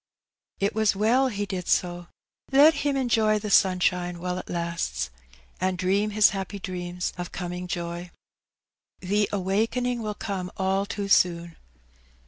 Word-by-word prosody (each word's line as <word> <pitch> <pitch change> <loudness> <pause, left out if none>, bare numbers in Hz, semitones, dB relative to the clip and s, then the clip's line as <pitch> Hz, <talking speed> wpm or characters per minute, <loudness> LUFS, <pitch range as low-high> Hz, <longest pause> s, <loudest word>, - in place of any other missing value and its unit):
It 200 +1 +1
was 220 -2 +2
well 235 +6 +3
he 205 -4 -2
did 185 -3 -5
so. 175 -1 0 0.4
Let 290 +4 +7
him 285 -2 -1
enjoy 225 -4 +2
the 210 0 -4
sunshine 180 -2 +2
while 180 +1 -3
it - - -10
lasts, 170 - -2 0.5
and 185 0 0
dream 195 +4 +1
his 210 0 +5
happy 195 +1 -4
dreams 180 -2 -4
of 175 - -5
coming 180 0 -5
joy. 175 0 -4 0.9
The 205 +2 +1
awaking 225 +5 0
will 210 -1 -3
come 190 -4 -4
all 195 +1 0
too 200 -1 -4
soon. 170 -3 +2
190 Hz, 140 wpm, -26 LUFS, 180-210 Hz, 0.9 s, Let